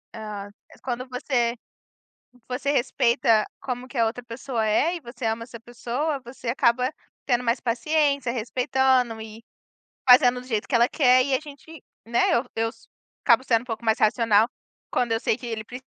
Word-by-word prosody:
Hã, 210 -2 -6 0.2
eh, - - -16
quando 250 0 -4
você 245 -2 -1 0.9
você 260 +3 -1
respeita 235 -4 +2
como 250 -1 -5
que 260 0 -10
a 230 - +4
outra 240 +2 -3
pessoa 235 -1 -3
é 305 +11 +2
e 335 - -7
você 240 -1 -8
ama 225 +1 -1
essa 235 -1 -11
pessoa, 250 +5 -3
você 240 0 -10
acaba 250 +1 +2 0.4
tendo 250 -2 +1
mais 235 +1 +1
paciência, 280 +1 +1
respeitando 250 0 +1
e 220 +1 -10 0.7
fazendo 250 0 +7
do 250 - -13
jeito 220 -4 -2
que 260 - -4
ela 235 +1 +5
quer. 255 -4 +4
E 275 -1 0
a - - -6
gente, 305 +1 -13 0.2
né 235 +1 +2
eu 235 - +2
eu 225 0 +1
s 225 -1 -21 0.4
acabo 245 +1 +4
sendo 230 -2 +2
um - - -14
pouco 230 0 -5
mais 220 0 +2
racional 220 0 +3 0.4
quando 245 -2 0
eu 225 - 0
sei 220 - +1
que 250 - -9
ele 220 -2 -4
pre 250 +3 -9
245 Hz, 185 wpm, -24 LUFS, 230-260 Hz, 0.9 s, fazendo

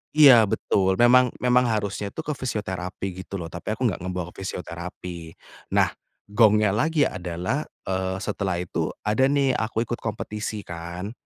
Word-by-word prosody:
Iya, 130 -8 +8
betul, 95 -1 +1
memang 125 +2 +5
memang 125 0 +4
harusnya 105 -2 -1
itu - - -6
ke 150 - -3
fisioterapi 95 -9 -4 0.2
gitu 100 - -8
loh, 85 -3 -5
tapi 105 +5 -4
aku 125 - -4
enggak 100 - -2
ngebawa 90 -1 -4
ke - - -14
fisioterapi. 85 -2 -7 0.4
Nah, - - +4 0.4
gongnya 105 -2 +5
lagi 150 +8 +2
adalah, 90 - -2 0.2
eee, 95 0 -1
setelah 95 -3 -1
itu 85 - -2 0.2
ada 110 +6 +3
nih 140 -1 +2
aku 110 +1 -1
ikut 120 +1 -4
kompetisi 105 -1 -4
kan. 85 +4 -6
105 Hz, 155 wpm, -25 LUFS, 90-120 Hz, 0.4 s, Iya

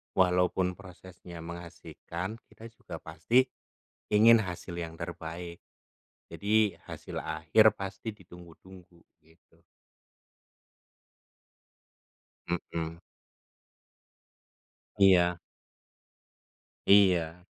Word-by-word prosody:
walaupun 90 0 +2
prosesnya 90 -2 -12
mengasyikkan, 85 +3 -7
kita 115 - -12
juga 115 - -10
pasti 115 +12 +1 0.6
ingin 115 +2 +7
hasil 90 -1 -6
yang 80 -1 -5
terbaik. 85 0 -7 0.7
Jadi 105 -1 +2
hasil - - -8
akhir 80 +8 +3
pasti 95 +3 -6
ditunggu-tunggu 90 -1 -16 0.2
gitu. 80 +2 -28 2.9
Mmm. 85 -1 -3 2.0
Iya. 90 -3 +5 1.5
Iya. 90 -3 +4
90 Hz, 65 wpm, -29 LUFS, 85-95 Hz, 2.9 s, ingin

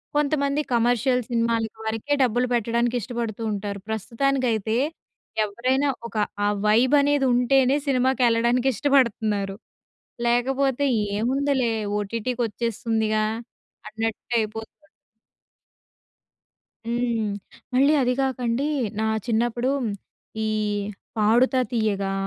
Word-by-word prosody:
కొంతమంది 290 0 +1
కమర్షియల్ 245 +2 +2
సినిమాల 230 -1 +1 0.2
వరకే 225 +6 -1
డబ్బులు 245 0 +1
పెట్టడానికి 235 +1 +1
ఇష్టపడుతూ 235 -1 -4
ఉంటారు. 200 0 -4
ప్రస్తుతానికైతే 230 0 0 0.7
ఎవరైనా 255 +7 0 0.2
ఒక 230 - -7 0.3
ఆ - - +3 0.2
వైబ్ 240 +6 +4
అనేది 285 -1 +2
ఉంటేనే, 255 +2 +3
సినిమాకి 260 0 +2
ఎళ్ళడానికి 235 +2 +2
ఇష్టపడుతున్నారు. 215 -7 +1 0.7
లేకపోతే 265 +3 +1 0.3
ఏముందిలే 260 +1 +1 0.3
ఓటీటీకి 230 +4 -3
వచ్చేస్తుందిగా 220 -1 -1 0.6
అన్నట్టయిపోతుంది. 225 0 -2 2.2
హ్మ్. 235 -2 0 0.5
మళ్ళీ 275 +4 +4
అది 250 -1 +2
కాకండి 255 -1 -1 0.3
నా - - +1 0.2
చిన్నప్పుడు 240 +2 0 0.8
ఈ - - 0 0.7
'పాడుతా 235 +5 +3
తీయగా' 205 -4 0
235 Hz, 85 wpm, -24 LUFS, 220-260 Hz, 2.2 s, వైబ్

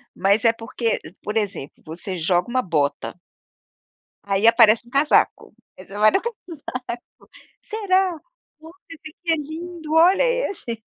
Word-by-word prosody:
Mas 200 +4 +2
é 230 - +5
porque 230 0 -2 0.2
por 210 +1 -4
exemplo, 200 -9 -4
você 175 +4 -5
joga 175 +2 +1
uma 255 +1 +1
bota 150 - -1 1.1
aí 200 +2 +1
aparece 230 0 +5
um 240 - -18
casaco, 280 +3 +2 0.2
aí 185 - -12
você 200 +1 -9
vai 215 +1 +6
no 385 - +1
casaco: 345 - -6 0.8
"Será, 380 -5 0 0.4
olha 320 +1 -13 0.2
esse 315 -1 -10
aqui - - -28
é - - +2
lindo, 320 +1 -6
olha 350 +6 +5 0.3
esse". 230 - -6
240 Hz, 145 wpm, -22 LUFS, 205-325 Hz, 1.1 s, vai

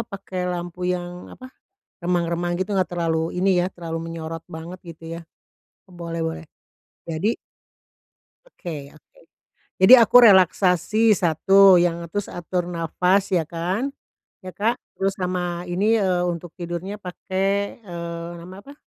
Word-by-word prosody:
apa 200 - -7
pakai 190 -1 -6
lampu 175 0 -5
yang, 180 0 -4
apa, 255 0 -12 0.5
remang-remang 175 0 0
gitu 195 +1 -1
enggak 185 -1 +1
terlalu 165 -1 -1
ini 195 +2 +3
ya, - - 0
terlalu 165 -2 -5
menyorot 165 0 -6
banget 165 +3 -8
gitu 165 -1 -11
ya. - - -8 0.7
Boleh 170 -1 -6
boleh. 160 0 -4 0.6
Jadi 175 +8 -1 1.1
Oke 155 - -8
oke. 155 - -23 0.6
Jadi 190 +6 +8
aku 235 -2 +4
relaksasi, 190 +3 +4
satu 190 +3 +5
yang 170 -1 0
terus 205 +1 -3
atur 175 0 -3
napas 180 +4 0
ya 170 -4 +1
kan, 180 +10 -2 0.6
ya, 185 - -7
Kak. 220 +6 0 0.2
Terus 195 0 0
sama 180 -2 -3
ini, 205 +6 +2
eee, 185 -4 +1
untuk 170 -1 -4
tidurnya 175 +4 -5
pakai, 195 +2 -2
eee, 170 -4 -6
namanya 185 +3 -11
apa 280 - -10
180 Hz, 135 wpm, -23 LUFS, 170-195 Hz, 1.1 s, Jadi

